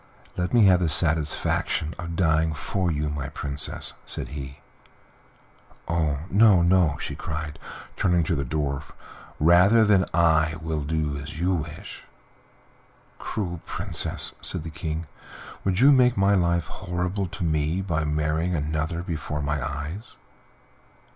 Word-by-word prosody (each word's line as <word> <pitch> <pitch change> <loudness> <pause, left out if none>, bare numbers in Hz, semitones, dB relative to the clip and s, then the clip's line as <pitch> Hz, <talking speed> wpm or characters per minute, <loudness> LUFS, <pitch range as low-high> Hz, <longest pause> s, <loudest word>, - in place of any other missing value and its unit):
"Let 90 0 -2
me 120 -4 +5
have 95 -2 +6
the 85 -3 +1
satisfaction 80 0 +1
of 85 -1 -5
dying 80 -2 +2
for 90 +5 -2
you, 75 -2 -1
my 75 -2 -4
Princess," 70 0 -2
said - - -5
he. 70 -2 -7 1.3
"Oh, 80 -4 0
no, 100 -3 +6
no!" 85 -4 +3
she - - -4
cried, 75 -1 -5 0.4
turning 90 -2 +2
to 80 - -1
the 70 -3 -1
Dwarf; 70 0 -3 0.5
"rather 90 +8 +6
than 100 -3 +4
that - - -3
I 80 -2 +3
will 80 -1 -3
do 75 -1 -2
as 70 +3 -8
you 90 +2 +1
wish." 80 -2 -6 1.2
"Cruel 90 -5 -4
Princess!" - - 0
said - - -1
the 80 - -7
King, 80 +1 -4 0.6
"would 95 -1 0
you 140 +2 +8
make 125 -4 +4
my 100 +1 +4
life 85 -3 +2
horrible 90 +2 -3
to 90 - -6
me 80 +1 0
by 80 -4 -1
marrying 75 +3 0
another 80 +3 -2
before 75 -4 -4
my 75 -1 -1
eyes?" 75 - -6
80 Hz, 140 wpm, -25 LUFS, 75-90 Hz, 1.3 s, you